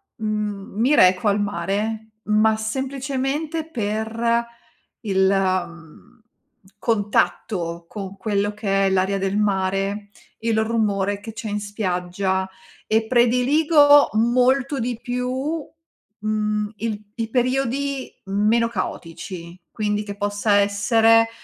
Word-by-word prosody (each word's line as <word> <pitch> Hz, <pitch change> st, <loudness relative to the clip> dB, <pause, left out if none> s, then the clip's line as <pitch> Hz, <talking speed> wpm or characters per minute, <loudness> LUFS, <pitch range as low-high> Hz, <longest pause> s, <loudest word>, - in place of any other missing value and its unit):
mhmm, 210 Hz, -3 st, -4 dB
mi 260 Hz, +6 st, +4 dB
reco 185 Hz, -2 st, +5 dB
al 205 Hz, 0 st, +2 dB
mare, 205 Hz, +4 st, -2 dB
ma 215 Hz, +1 st, +3 dB
semplicemente 270 Hz, +6 st, -3 dB
per 230 Hz, -1 st, -1 dB, 0.6 s
il, 190 Hz, -3 st, +2 dB
mhmm, 180 Hz, -3 st, -3 dB, 0.6 s
contatto 200 Hz, -5 st, -1 dB
con 195 Hz, -2 st, -7 dB
quello 205 Hz, 0 st, -1 dB
che 195 Hz, -2 st, 0 dB
è -, -, +2 dB
l'aria 190 Hz, +1 st, +1 dB
del 195 Hz, 0 st, -1 dB
mare, 195 Hz, 0 st, 0 dB, 0.3 s
il 225 Hz, -1 st, 0 dB
rumore 205 Hz, -3 st, 0 dB
che 220 Hz, +2 st, -9 dB
c'è 225 Hz, 0 st, -6 dB
in 205 Hz, 0 st, -2 dB
spiaggia, 190 Hz, -2 st, -2 dB, 0.4 s
e 220 Hz, 0 st, +1 dB
prediligo 285 Hz, +5 st, +5 dB
molto 250 Hz, +5 st, +2 dB
di 235 Hz, 0 st, -2 dB
più, 260 Hz, +5 st, -3 dB, 0.5 s
mhmm, 210 Hz, 0 st, -1 dB
il 215 Hz, -1 st, -3 dB
i 225 Hz, -1 st, -3 dB
periodi 265 Hz, +2 st, -1 dB
meno 210 Hz, +4 st, +2 dB
caotici. 175 Hz, -4 st, -6 dB
Quindi 210 Hz, -1 st, -1 dB
che 200 Hz, -1 st, -7 dB
possa 205 Hz, +1 st, 0 dB
essere, 225 Hz, +3 st, +4 dB
215 Hz, 110 wpm, -22 LUFS, 200-235 Hz, 0.6 s, reco